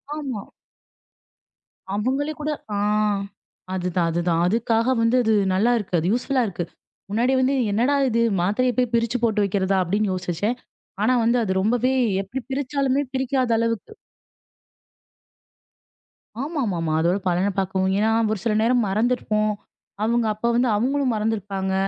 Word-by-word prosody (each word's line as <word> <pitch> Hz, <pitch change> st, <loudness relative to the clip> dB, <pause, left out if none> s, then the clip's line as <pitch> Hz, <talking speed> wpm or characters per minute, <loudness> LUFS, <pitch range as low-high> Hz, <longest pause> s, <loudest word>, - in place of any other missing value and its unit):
ஆமா. 265 Hz, -9 st, -4 dB, 1.5 s
அவங்களே 270 Hz, +8 st, -1 dB
கூட 305 Hz, -, -2 dB, 0.3 s
ஆ. -, -, -1 dB, 1.0 s
அதுதான், 180 Hz, -2 st, 0 dB
அதுதான். 170 Hz, 0 st, 0 dB
அதுக்காக 230 Hz, +4 st, +1 dB
வந்து 230 Hz, +2 st, +3 dB
அது 220 Hz, 0 st, +2 dB, 0.2 s
நல்லாருக்கு. 215 Hz, -1 st, +1 dB
அது 170 Hz, -, -2 dB
யூஸ்ஃபுல்லா 255 Hz, +1 st, 0 dB
இருக்கு. 175 Hz, -2 st, -4 dB, 0.5 s
முன்னாடி 240 Hz, +5 st, +1 dB
வந்து 260 Hz, +2 st, +2 dB, 0.2 s
என்னடா 245 Hz, +7 st, +2 dB
இது! 230 Hz, 0 st, +1 dB, 0.2 s
மாத்திரய 245 Hz, +7 st, +1 dB
போய் 250 Hz, -2 st, +1 dB
பிரிச்சு 235 Hz, +1 st, +1 dB
போட்டு 215 Hz, -2 st, +2 dB
வைக்கிறதா? 195 Hz, 0 st, 0 dB
அப்டின்னு 200 Hz, +3 st, 0 dB
யோசிச்சேன். 185 Hz, +6 st, -2 dB, 0.5 s
ஆனா 255 Hz, +3 st, +3 dB
வந்து 235 Hz, +2 st, +3 dB
அது 190 Hz, -, -1 dB
ரொம்பவே 245 Hz, +4 st, +1 dB, 0.3 s
எப்டி 205 Hz, +7 st, -5 dB
பிரிச்சாலுமே 275 Hz, 0 st, 0 dB
பிரிக்காத 260 Hz, -1 st, 0 dB
அளவுக்கு 230 Hz, -, -2 dB, 2.5 s
ஆமாமாமா. 205 Hz, -, -2 dB
அதோட 175 Hz, +4 st, +2 dB
பலனப் 185 Hz, +3 st, 0 dB
பாக்கவும். 190 Hz, 0 st, 0 dB
ஏன்னா 215 Hz, +2 st, +2 dB, 0.2 s
ஒரு 205 Hz, -, -4 dB
சில 225 Hz, -2 st, +1 dB
நேரம் 240 Hz, -1 st, +2 dB
மறந்துருப்போம். 215 Hz, -1 st, +1 dB, 0.5 s
அவங்க 235 Hz, +1 st, +1 dB
அப்ப 215 Hz, +3 st, -6 dB
வந்து 245 Hz, 0 st, +2 dB
அவங்களும் 260 Hz, +2 st, +1 dB
மறந்துருப்பாங்க. 200 Hz, -3 st, -2 dB
225 Hz, 125 wpm, -23 LUFS, 195-250 Hz, 2.5 s, வந்து